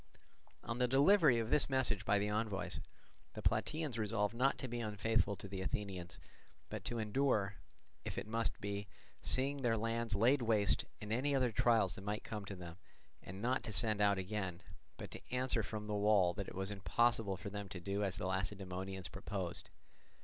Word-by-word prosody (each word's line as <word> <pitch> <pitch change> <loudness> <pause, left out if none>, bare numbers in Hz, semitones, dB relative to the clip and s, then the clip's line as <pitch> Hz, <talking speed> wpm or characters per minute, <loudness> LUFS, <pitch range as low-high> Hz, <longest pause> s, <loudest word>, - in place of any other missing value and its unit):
On 115 +1 -3
the 125 - +4
delivery 140 +1 +6
of 115 -1 -1
this 150 - +4
message 125 -6 +2
by 105 - +4
the 100 +1 +1
envoys, 105 -4 -1 0.6
the - - -6
Plataeans 155 -7 0
resolved 105 0 0
not 130 +4 +2
to 130 - -4
be 120 0 -3
unfaithful 110 -1 +1
to 100 - -9
the 95 -1 -5
Athenians 95 -2 -4 0.5
but - - -5
to 120 - -1
endure, 110 -3 +1 0.5
if - - -5
it - - -2
must 115 +1 -1
be, 100 0 -3 0.3
seeing 135 +2 +1
their 115 -3 +2
lands 115 -1 -1
laid 125 +7 +4
waste 110 -4 +3
and 105 +1 -3
any 140 +4 +1
other 130 -3 +2
trials 110 -4 +3
that 95 - -9
might 105 +1 -2
come 105 -2 -5
to 100 - -6
them, 90 -1 -9 0.4
and 95 +4 -8
not 125 +2 +2
to 110 - -5
send 105 +2 +2
out 100 -1 +4
again, 95 -2 -3 0.3
but - - -7
to - - -7
answer 125 -2 +1
from 105 0 -5
the 105 - -3
wall 100 -3 +4
that 100 - -4
it - - -8
was 95 +2 -2
impossible 105 0 +1
for 100 +2 -6
them 100 -1 -5
to 90 - -6
do 100 +3 -1
as 95 -3 -1
the 95 - -3
Lacedaemonians 95 0 -3
proposed. 80 - -4
105 Hz, 190 wpm, -37 LUFS, 100-115 Hz, 0.6 s, delivery